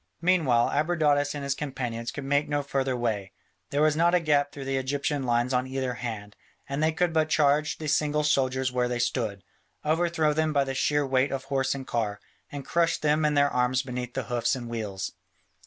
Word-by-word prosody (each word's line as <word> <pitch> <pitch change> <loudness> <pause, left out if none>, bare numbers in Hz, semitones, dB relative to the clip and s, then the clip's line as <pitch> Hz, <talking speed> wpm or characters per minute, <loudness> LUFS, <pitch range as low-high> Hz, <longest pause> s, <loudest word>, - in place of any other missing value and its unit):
Meanwhile 160 -10 +3
Abradatas 150 -2 +1
and 145 - -5
his 140 0 0
companions 125 -5 -4
could 145 - -6
make 145 +2 +1
no 145 -1 0
further 135 -2 -1
way: 105 -5 -2 0.4
there 145 +2 +1
was 155 -1 +3
not 170 +2 +3
a - - +5
gap 145 -3 +2
through 140 -2 -8
the 135 0 -1
Egyptian 140 +1 -1
lines 120 +2 +1
on 125 +1 +1
either 130 -1 -2
hand, 110 -4 -6 0.3
and 140 +2 -3
they 160 +1 +3
could 170 +1 0
but 155 -1 +2
charge 150 0 +2
the 155 - -5
single 150 0 +1
soldiers 130 -3 +1
where 125 -1 +1
they 125 0 -2
stood, 115 -5 -1 0.4
overthrow 160 -1 +2
them 155 0 0
by 140 -1 +3
the 135 0 -3
sheer 145 +2 +1
weight 130 +1 +1
of 135 -1 -3
horse 135 -1 0
and 135 -1 -6
car, 105 -5 -2 0.3
and 140 -2 -6
crush 170 -1 +1
them 150 +1 +1
and 150 -1 +2
their 145 0 +4
arms 125 +1 +1
beneath 125 -2 -5
the - - -1
hoofs 120 +1 0
and 120 -2 -6
wheels. 100 -5 -4
140 Hz, 205 wpm, -27 LUFS, 125-150 Hz, 0.4 s, a